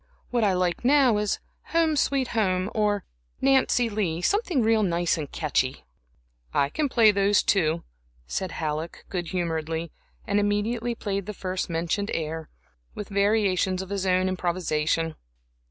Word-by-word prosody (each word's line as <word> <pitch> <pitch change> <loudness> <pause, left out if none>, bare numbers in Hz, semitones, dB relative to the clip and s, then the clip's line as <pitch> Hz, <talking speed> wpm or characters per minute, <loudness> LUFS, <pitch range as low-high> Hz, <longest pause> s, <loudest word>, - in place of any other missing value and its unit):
What 240 -2 +1
I 200 -3 +3
like 180 +1 0
now 260 -4 +5
is 210 -1 -1 0.3
'Home, 325 -2 +3
Sweet 275 -3 +1
Home,' 190 -4 0
or 210 -2 +1 0.3
'Nancy 265 -2 +3
Lee' 185 -6 -2
something 370 - +1
real 220 0 +3
nice 175 -3 +1
and 150 -4 -5
catchy." 140 -3 -1 0.7
"I 140 - +3
can 290 - -1
play 225 -4 +6
those, 200 0 +3
too," 165 -4 +2 0.4
said 185 - -3
Halleck, 155 +1 -4
good 175 -3 -3
humoredly, 165 -2 -2 0.3
and 205 0 +1
immediately 220 +4 0
played 200 -3 -3
the 210 - -5
first 185 -1 -3
mentioned 170 +5 -1
air, 160 0 -4 0.5
with 210 - -6
variations 200 -2 +2
of 190 - -11
his 195 -1 -1
own 185 0 +3
improvisation. 165 -3 0
195 Hz, 145 wpm, -26 LUFS, 170-215 Hz, 0.7 s, play